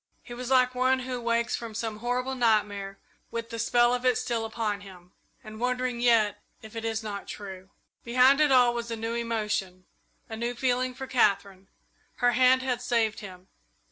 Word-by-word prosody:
He 240 - -10
was 250 +1 -6
like 255 -1 +4
one 260 +1 +2
who 250 -1 -4
wakes 235 0 0
from 230 -2 -7
some 220 -1 -3
horrible 250 +3 -1
nightmare 205 -5 0 0.3
with 230 0 -5
the 230 - -5
spell 240 +1 +3
of 250 0 -2
it 250 -2 +3
still 230 -2 -2
upon 215 -2 -3
him, 180 -3 -14 0.3
and 215 -1 -10
wondering 250 0 -1
yet 225 -4 +3 0.2
if 220 +1 -12
it 225 - -5
is 225 0 -2
not 205 -2 -6
true. 190 -2 -8 0.3
Behind 255 +4 +4
it 300 -2 +4
all 250 -2 +5
was 235 0 -4
a 230 - -2
new 225 +1 -4
emotion, 210 -6 -2 0.4
a 225 - -6
new 235 +2 -3
feeling 255 0 0
for 265 +1 -6
Katherine. 200 -6 +1 0.5
Her 245 -1 +2
hand 255 +1 +4
had 250 -2 -1
saved 230 -3 0
him. 185 -2 -11
235 Hz, 185 wpm, -27 LUFS, 215-250 Hz, 0.5 s, all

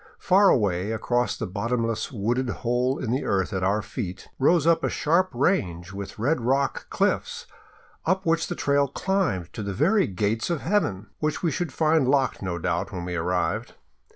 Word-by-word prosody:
Far 195 +1 +4
away 100 -2 +1
across 120 +2 0
the - - -3
bottomless 115 +3 -2
wooded 120 +3 -1
hole 125 +3 0
in 115 - -3
the 130 +3 0
earth 95 +1 0
at 95 -1 -1
our 100 +3 +1
feet 95 -7 -6
rose 150 +3 +4
a 165 0 +3
sharp 175 +4 +2
range 90 - 0
with 100 0 -7
red 130 +6 +1
rock 135 +3 0
cliffs - - -1 0.6
up 190 +3 0
which 165 0 +1
the 175 - -4
trail 140 -2 +2
climbed 140 - -1
to - - -5
the 100 -1 -4
very 190 - +3
gates 105 - -1
of 170 -4 -1
heaven 110 - -1
— - - -45
which 155 +2 -2
we 165 - +2
should 175 -1 -2
find 155 -2 +2
locked 135 0 +1
no 90 -3 -3
doubt 85 - -2
when 90 -1 -5
we 90 - -4
arrived. 90 +2 -1
125 Hz, 180 wpm, -25 LUFS, 100-160 Hz, 0.6 s, Far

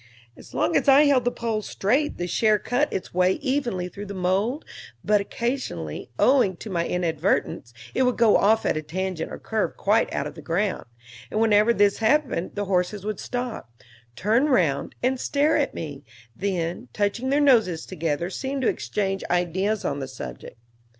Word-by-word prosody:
As - - -14
long - - +1
as - - +2
I 275 +2 +7
held 280 -4 +3
the 245 - +2
pole 225 -3 -2
straight 255 +9 0
the 175 - -2
share 215 +4 +2
cut 245 +8 0
its 185 - -4
way 180 +1 +3
evenly 240 -10 -1
through 200 +3 -8
the 200 - -6
mold, 195 - 0 0.4
but 210 -1 +3
occasionally, 200 - -4
owing 245 -9 +3
to 215 - -8
my 170 -2 0
inadvertence, 165 -7 -1 0.2
it - - 0
would 250 -1 +2
go 230 -3 +5
off 220 +2 +3
at - - +1
a 155 - -1
tangent 175 +2 -4
or - - -6
curve 220 -1 -2
quite 215 +3 +2
out 140 - -2
of 150 - -6
the 160 - -11
ground; 180 +7 -1 0.4
and 215 - -2
whenever 220 0 +4
this 205 -3 +3
happened 250 - +1
the 205 0 -2
horses 190 +1 -1
would 215 -2 -3
stop, 245 - -4 0.5
turn 225 - +2
round 160 - +1
and 255 +1 +1
stare 295 +4 +2
at 285 -2 0
me, 145 -3 -6 0.3
then, 175 -7 -2
touching 210 +5 -1
their 280 +2 +3
noses 220 - +3
together 165 +2 -2
seem 270 +6 -3
to 260 - +1
exchange 195 -2 -1
ideas 185 +4 0
on 140 - -1
the 135 - -4
subject. 130 -2 -9
205 Hz, 180 wpm, -24 LUFS, 180-245 Hz, 0.5 s, I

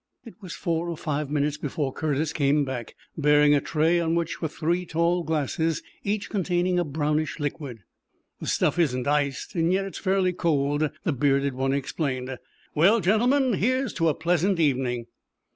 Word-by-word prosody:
It 230 - -10
was 185 -4 -7
four 170 0 -2
or 170 - -4
five 150 -2 -2
minutes 150 0 0
before 145 -2 -3
Curtis 155 0 -1
came 145 0 +2
back, 125 -4 -6 0.2
bearing 150 -1 +4
a 145 - +3
tray 165 +3 +2
on 165 -1 0
which 170 -1 -2
were 160 - 0
three 170 +3 -1
tall 170 +1 +1
glasses, 160 0 -1 0.2
each 205 0 -1
containing 180 -2 0
a - - +2
brownish 150 +1 -1
liquid. 140 - -5 0.6
"The - - -6
stuff - - +1
isn't 130 -7 +1
iced, 145 -2 0
yet 180 +3 +1
it's 195 - -7
fairly 190 -1 +1
cold," 150 -3 +1
the 165 - 0
bearded 140 0 +1
one 135 +1 -1
explained. 130 -2 -2 0.4
"Well, 190 +9 +4
gentlemen, 245 - +3
here's 255 +4 0
to 165 -2 +2
a 150 - 0
pleasant 175 +3 +1
evening!" 130 -5 +1
155 Hz, 165 wpm, -25 LUFS, 140-175 Hz, 0.6 s, bearing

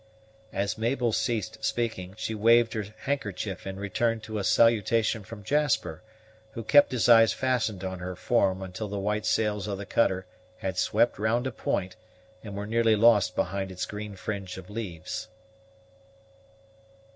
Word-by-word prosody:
As 100 +2 -2
Mabel 120 +1 +1
ceased 110 -1 -2
speaking, 110 -6 -2
she 110 0 -3
waved 115 +2 +4
her 110 -3 -2 0.2
handkerchief 105 -9 -3
in 95 - -4
return 115 +3 0
to 110 -1 -5
a - - -2
salutation 115 0 +3
from 105 +1 -10
Jasper, 145 -2 0 0.5
who 115 - -5
kept 145 +5 +5
his 125 -3 +1
eyes 115 -2 +7
fastened 120 -7 -1
on 95 -1 -4
her 90 +1 -5
form 95 +2 +1
until 95 +3 -5
the 100 0 -4
white 105 +2 -1
sails 105 -2 0
of 100 -2 -3
the 100 - -6
cutter 95 -2 +1 0.3
had 95 -4 -3
swept 120 +3 +2
round 115 +4 +1
a 130 - -1
point, 95 -4 -2 0.5
and 100 -3 -7
were 100 +1 -4
nearly 115 0 +3
lost 105 -4 +4
behind 95 +1 -2
its 90 0 -3
green 105 0 -7
fringe 95 -2 -5
of 95 +1 -10
leaves. 105 -3 -5
105 Hz, 155 wpm, -27 LUFS, 95-115 Hz, 0.5 s, eyes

